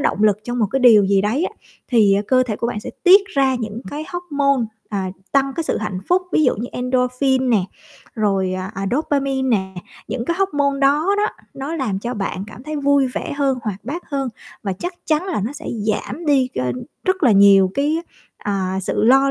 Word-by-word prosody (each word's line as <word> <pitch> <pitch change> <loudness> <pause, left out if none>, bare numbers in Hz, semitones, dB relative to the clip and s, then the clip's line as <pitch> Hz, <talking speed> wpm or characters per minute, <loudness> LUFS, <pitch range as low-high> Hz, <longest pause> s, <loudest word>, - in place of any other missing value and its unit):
động 210 - 0
lực 210 -2 +4
trong 240 +1 -3
một 215 - +2
cái 270 - 0
điều 220 -5 +7
gì 195 0 +3
đấy 230 - 0
á, 405 - -3 0.4
thì 210 -5 +4
cơ 255 -1 +4
thể 220 -4 -3
của 235 - -2
bạn 225 -3 -3
sẽ - - -7
tiết 380 +3 +9
ra 270 -1 +3
những 225 -1 -4
cái 300 +2 -5
hóc 355 0 -5
môn, 275 -4 +2 0.2
à, 195 -3 -2 0.2
tăng 275 -1 +2
cái 330 - -1
sự - - -1
hạnh 190 -4 -3
phúc. 360 +1 +3
Ví 310 - +3
dụ 255 - +3
như 235 +4 -4
endorphin 250 +1 +1
nè, 205 -6 +3 0.5
rồi, 195 -4 0
à, 185 +1 -4
à, 195 +1 -3
dopamine 275 -1 0
nè. 190 0 -7 0.3
Những 240 -2 -3
cái 340 +4 -1
hóc 390 -5 0
môn 280 -1 +1
đó 290 +6 +3
đó, 415 +1 +2 0.3
nó 280 +5 -4
làm 230 -11 -1
cho 240 +4 -4
bạn 195 -2 -3
cảm 230 +3 -11
thấy 305 +1 -5
vui 280 -1 +3
vẻ 250 - -4
hơn, 275 -3 0
hoạt 210 -1 -5
bát 320 +8 -4
hơn 275 -2 -1 0.3
và 195 - -2
chắc 350 - -5
chắn 310 +3 +1
là 350 - -1
nó 225 +8 -3
sẽ 290 - -9 0.2
giảm 305 +9 -3
đi 270 -3 +3
kênh 125 -1 -1 0.3
rất 375 -1 0
là 245 -7 +5
nhiều 195 -1 +6
cái, 295 +4 +1 0.4
à, 190 -2 -2
sự - - -1
lo 270 +3 +5
255 Hz, 220 wpm, -20 LUFS, 210-285 Hz, 0.5 s, tiết